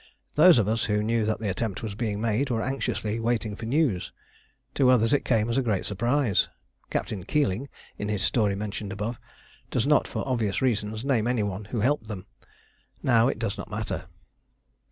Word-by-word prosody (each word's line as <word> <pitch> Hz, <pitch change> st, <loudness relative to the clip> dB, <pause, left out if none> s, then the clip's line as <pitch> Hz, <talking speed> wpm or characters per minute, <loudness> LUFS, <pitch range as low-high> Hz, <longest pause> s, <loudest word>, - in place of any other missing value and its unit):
Those 170 Hz, +1 st, +7 dB
of 110 Hz, -4 st, +2 dB
us 115 Hz, +1 st, +1 dB
who 105 Hz, -2 st, +1 dB
knew 115 Hz, 0 st, +1 dB
that 110 Hz, 0 st, 0 dB
the 110 Hz, -2 st, -3 dB
attempt 100 Hz, +1 st, -3 dB
was 110 Hz, -2 st, -3 dB
being 105 Hz, -1 st, -2 dB
made 115 Hz, +5 st, 0 dB
were 115 Hz, -2 st, 0 dB
anxiously 115 Hz, -4 st, -2 dB
waiting 115 Hz, -2 st, -1 dB
for 115 Hz, +1 st, -6 dB
news. 130 Hz, -, +1 dB, 0.6 s
To 130 Hz, -3 st, +4 dB
others 115 Hz, -2 st, +4 dB
it 145 Hz, -, +3 dB
came 110 Hz, -3 st, +2 dB
as 120 Hz, +3 st, +1 dB
a -, -, +2 dB
great 110 Hz, -7 st, 0 dB
surprise. 120 Hz, +2 st, +1 dB, 0.4 s
Captain 95 Hz, -4 st, -2 dB
Keeling, 135 Hz, -, 0 dB, 0.3 s
in 105 Hz, -, -2 dB
his 105 Hz, -2 st, -1 dB
story 100 Hz, +2 st, +2 dB
mentioned 105 Hz, 0 st, -4 dB
above, 105 Hz, +4 st, -4 dB, 0.5 s
does -, -, 0 dB
not, -, -, +4 dB
for -, -, -4 dB
obvious 115 Hz, -6 st, 0 dB
reasons, 110 Hz, -2 st, -1 dB
name 120 Hz, -5 st, +2 dB
any 120 Hz, -3 st, +1 dB
one 100 Hz, 0 st, -3 dB
who 110 Hz, +1 st, -3 dB
helped 125 Hz, -1 st, +1 dB
them. 100 Hz, -4 st, -6 dB, 0.8 s
Now 120 Hz, -2 st, +4 dB
it 135 Hz, -, 0 dB
does 110 Hz, -3 st, -3 dB
not -, -, -6 dB
matter. -, -, -3 dB
110 Hz, 190 wpm, -26 LUFS, 105-125 Hz, 0.8 s, Those